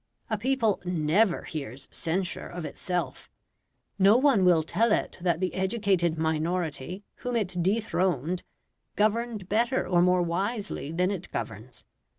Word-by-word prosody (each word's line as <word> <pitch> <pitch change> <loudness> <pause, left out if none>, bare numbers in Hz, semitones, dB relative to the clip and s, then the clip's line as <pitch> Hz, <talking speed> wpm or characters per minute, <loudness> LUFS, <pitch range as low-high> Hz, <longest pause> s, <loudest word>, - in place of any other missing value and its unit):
A 220 - +1
people 235 -3 +1
NEVER 180 +3 +2
hears 135 -4 -6
censure 175 +2 -2
of 175 -2 -6
itself. 180 +1 -3 0.7
No 200 +4 +6
one 260 -7 +4
will 170 -3 +5
tell 215 +8 +2
it - - 0
that 175 -2 +1
the 185 0 -1
educated 190 -4 +1
minority 160 +2 -2
whom 245 -1 -3
it 185 -6 0
dethroned 185 - 0 0.5
governed 215 -1 0
better 235 +5 +1
or 175 -1 +3
more 180 0 +4
wisely 195 - -2
than 180 +3 +1
it 190 -3 -5
governs. 115 +4 -6
185 Hz, 135 wpm, -27 LUFS, 170-210 Hz, 0.7 s, No